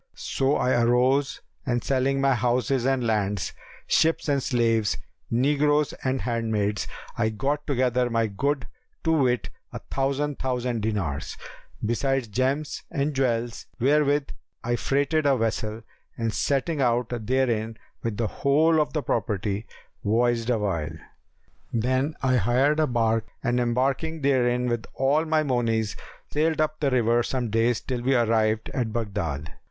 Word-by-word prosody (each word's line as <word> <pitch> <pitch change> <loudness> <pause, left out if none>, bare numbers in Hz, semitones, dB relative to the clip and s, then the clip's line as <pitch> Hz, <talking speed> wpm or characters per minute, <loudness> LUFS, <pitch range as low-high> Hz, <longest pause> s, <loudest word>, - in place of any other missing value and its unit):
So 135 +2 0
I 125 -1 +2
arose 130 +4 +2 0.2
and 120 -2 -1
selling 135 0 +1
my 135 0 +3
houses 125 +1 +1
and 135 -2 +1
lands, 105 -5 0 0.3
ships 160 0 +2
and 140 -2 +2
slaves, 115 -4 +1 0.3
negroes 145 +4 +2
and 130 0 0
handmaids, 110 -4 -1 0.3
I 110 -1 +3
got 140 +7 -2
together 125 -3 +1
my 115 -1 +1
good, 135 +5 -1 0.4
to 160 - +2
wit, 130 -6 +1 0.2
a - - -5
thousand 140 +1 -1
thousand 125 -3 -1
dinars, 100 -10 -2 0.5
besides 130 +1 0
gems 135 +7 -1
and 145 -1 -1
jewels, 120 -4 -1
wherewith 145 +2 +2 0.3
I 120 +1 0
freighted 140 +4 +1
a 135 -2 +4
vessel 110 -1 -2 0.3
and 115 -2 -1
setting 140 +2 0
out 120 -1 +2 0.2
therein 115 -4 0 0.2
with 115 -3 -3
the 115 - 0
whole 155 +7 +3
of 150 - -2
the 150 -3 -1
property, 105 -1 -1 0.4
voyaged 115 +2 +1
awhile. 90 -9 -1 0.7
Then 130 +6 0
I 130 -1 +3
hired 130 +8 +2
a 155 - +3
barque 115 -2 +1 0.2
and 125 -1 +1
embarking 135 +7 0
therein 125 -3 +2
with 120 -2 -2
all 140 +4 +2
my 155 -1 +2
monies 115 -5 0 0.4
sailed 155 +1 +1
up 155 0 0
the 145 - +2
river 120 -2 +3
some 120 -2 -2
days 115 +1 +2
till 125 -2 -3
we 130 +2 +2
arrived 110 -2 +2
at 120 -5 -1
Baghdad. 85 -10 -3
125 Hz, 140 wpm, -25 LUFS, 115-140 Hz, 0.7 s, a